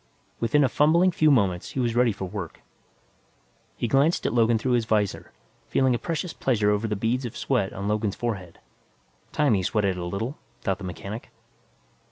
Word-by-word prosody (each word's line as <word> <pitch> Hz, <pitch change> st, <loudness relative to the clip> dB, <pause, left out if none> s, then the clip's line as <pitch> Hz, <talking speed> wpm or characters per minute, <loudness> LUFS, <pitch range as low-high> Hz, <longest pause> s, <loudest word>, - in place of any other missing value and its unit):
Within 130 Hz, +6 st, +3 dB
a -, -, +4 dB
fumbling 165 Hz, +8 st, +4 dB
few 155 Hz, -2 st, +3 dB
moments, 100 Hz, -10 st, +1 dB
he -, -, -3 dB
was 120 Hz, -2 st, 0 dB
ready 120 Hz, -1 st, +4 dB
for 95 Hz, -1 st, -5 dB
work. 95 Hz, -4 st, -7 dB, 1.1 s
He 120 Hz, -, -2 dB
glanced 140 Hz, +8 st, +2 dB
at -, -, 0 dB
Logan 115 Hz, -1 st, +3 dB
through 125 Hz, +4 st, -1 dB
his 120 Hz, -2 st, +2 dB
visor, 105 Hz, -3 st, -1 dB, 0.4 s
feeling 130 Hz, -1 st, +2 dB
a 120 Hz, -, -1 dB
vicious 165 Hz, 0 st, -3 dB
pleasure 105 Hz, -5 st, +1 dB
over 105 Hz, +2 st, 0 dB
the 105 Hz, -, -1 dB
beads 115 Hz, +6 st, -1 dB
of 120 Hz, -, -6 dB
sweat 120 Hz, -8 st, 0 dB
on 100 Hz, +1 st, -5 dB
Logan's 105 Hz, -1 st, 0 dB
forehead. 100 Hz, -8 st, -4 dB, 0.7 s
Time 145 Hz, -5 st, +2 dB
he 95 Hz, -, +2 dB
sweated 100 Hz, -1 st, 0 dB
a 90 Hz, -, -4 dB
little, 110 Hz, -, -4 dB, 0.2 s
thought 95 Hz, -2 st, -1 dB
the -, -, -9 dB
mechanic. 100 Hz, +5 st, -7 dB
115 Hz, 185 wpm, -25 LUFS, 100-130 Hz, 1.1 s, a